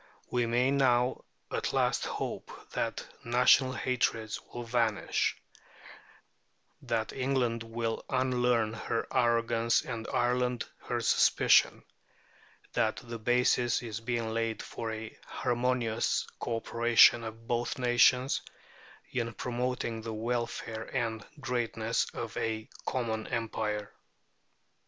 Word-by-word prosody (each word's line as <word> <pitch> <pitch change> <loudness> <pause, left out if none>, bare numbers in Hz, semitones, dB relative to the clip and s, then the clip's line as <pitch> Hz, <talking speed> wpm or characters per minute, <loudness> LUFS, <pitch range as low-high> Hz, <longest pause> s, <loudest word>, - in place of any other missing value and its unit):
We 120 -1 +1
may 125 +3 +2
now 125 -2 +2 0.3
at - - -2
last - - +1
hope - - -4 0.2
that - - -2 0.2
national 125 +2 +4
hatreds 115 -4 -1
will 120 - -5
vanish; 115 -2 0 1.4
that 110 -1 -2
England 130 -3 0
will 115 0 -3
unlearn 125 -4 +2
her 115 +1 -2
arrogance 115 -1 +2
and 115 -3 -5
Ireland 125 0 +1 0.2
her - - -1
suspicion; - - +4 0.9
that 110 - +1
the 115 -2 -7
basis 120 +1 +2
is 110 -3 -5
being 115 -1 -2
laid 115 -1 -1
for 115 -1 -5
a 110 0 -6
harmonious 120 -2 0
co 115 - -2
operation 115 +1 +5
of 115 +1 -8
both 120 +3 -1
nations 125 +1 +4 0.7
in 115 -2 -1
promoting 125 -2 -2
the 110 0 -5
welfare 115 -1 -3
and 115 -4 -1 0.2
greatness 115 -3 -1
of 115 -2 -6
a 110 0 -2 0.2
common 110 -4 -2
Empire. 105 -2 -2
120 Hz, 110 wpm, -30 LUFS, 115-125 Hz, 1.4 s, operation